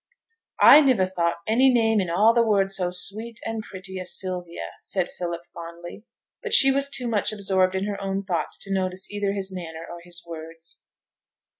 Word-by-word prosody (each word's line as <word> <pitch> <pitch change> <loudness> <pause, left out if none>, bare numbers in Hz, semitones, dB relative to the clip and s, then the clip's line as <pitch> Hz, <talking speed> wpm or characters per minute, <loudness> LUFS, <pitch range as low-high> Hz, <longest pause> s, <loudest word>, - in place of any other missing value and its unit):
'I 300 - +9
niver 255 -10 +3
thought 170 -2 -2
any 250 +5 +4
name 225 -3 +2
in 180 - -3
a' 210 +7 +4
the 235 - +3
world 200 -4 +2
so 185 -2 +2
sweet 215 +5 -2
and 225 -1 -3
pretty 190 -2 -8
as 180 0 -1
Sylvia,' 180 -2 -5
said 185 -3 -1
Philip, 170 -1 -5
fondly; 170 +4 -10 0.4
but - - +2
she 270 - +7
was 275 +1 0
too 250 -3 -2
much 220 -3 +1
absorbed 190 -3 +1
in 190 +1 -1
her 205 -1 -4
own 195 0 -2
thoughts 170 -5 -2
to 195 - -4
notice 185 0 -2
either 205 -1 -1
his 195 -1 -3
manner 165 -2 -7
or 175 - -9
his 175 0 -7
words. 165 0 -7
190 Hz, 185 wpm, -24 LUFS, 175-215 Hz, 0.4 s, I